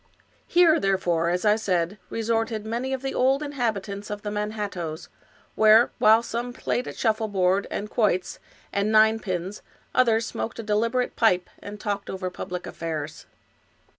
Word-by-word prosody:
Here, 340 -2 +5
therefore, 175 -4 +1
as 180 +4 -1
I 210 0 +5
said, 190 -2 -1
resorted 225 -1 -1
many 240 +4 -3
of 265 0 -3
the 270 - -2
old 270 +3 +2
in 290 - -5
habitants 205 -6 -3
of 205 0 -5
the 205 - -3
Manhattoes, 205 -6 -4 0.4
where, 220 +2 +6
while 220 +2 +6
some 235 +1 -4
played 245 0 -2
at - - -7
shuffleboard 200 -4 +1
and 210 - -4
quoits,^ 205 -5 0 0.3
and 200 +2 0
ninepins, 215 -4 +2 0.3
others 230 -2 +3
smoked 225 - -5
a 230 - -5
de 210 -1 0
liberate 230 +3 0
pipe, 185 -6 +2
and 205 +1 -9
talked 200 -1 -3
over 185 -1 -4
public 180 0 -6
affairs. 155 -2 -5
210 Hz, 155 wpm, -25 LUFS, 190-230 Hz, 0.4 s, where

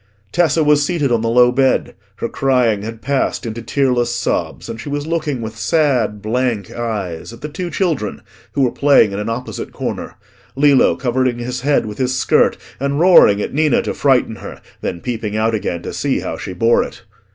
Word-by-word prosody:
Tessa 165 0 +2
was 150 -1 +4
seated 145 -4 0
on 115 -2 +2
the 115 - 0
low 125 +1 +5
bed: 130 +1 +1 0.2
her 115 - -3
crying 125 -6 +1
had 110 +1 -7
passed 135 -1 -1
into 115 0 -5
tearless 125 0 +1
sobs, 120 - -2
and 115 0 -6
she 145 - -7
was 145 0 -3
looking 155 -6 -2
with 110 0 -6
sad 120 -6 +1
blank 115 -3 -1
eyes 105 -7 -4
at 115 +1 -13
the 150 - -4
two 175 +4 -5
children, 160 - -2 0.3
who 140 - +1
were 125 - +2
playing 140 -7 +4
in 100 - -4
an 105 - -3
opposite 115 - -5
corner—Lillo 140 -1 0
covering 125 -1 0
his 125 +1 -4
head 140 -2 +2
with 105 +2 -7
his 130 0 0
skirt - - +3 0.2
and 140 +2 -1
roaring 160 - +6
at - - -5
Ninna 150 -1 +2
to - - -3
frighten - - +2
her, - - -9 0.2
then 85 - -4
peeping 110 -3 -3
out 110 +1 +1
again 90 -5 -2
to - - -6
see - - -1
how - - -4
she 95 - -6
bore 115 +6 +3
it. - - -7
125 Hz, 195 wpm, -18 LUFS, 110-140 Hz, 0.3 s, roaring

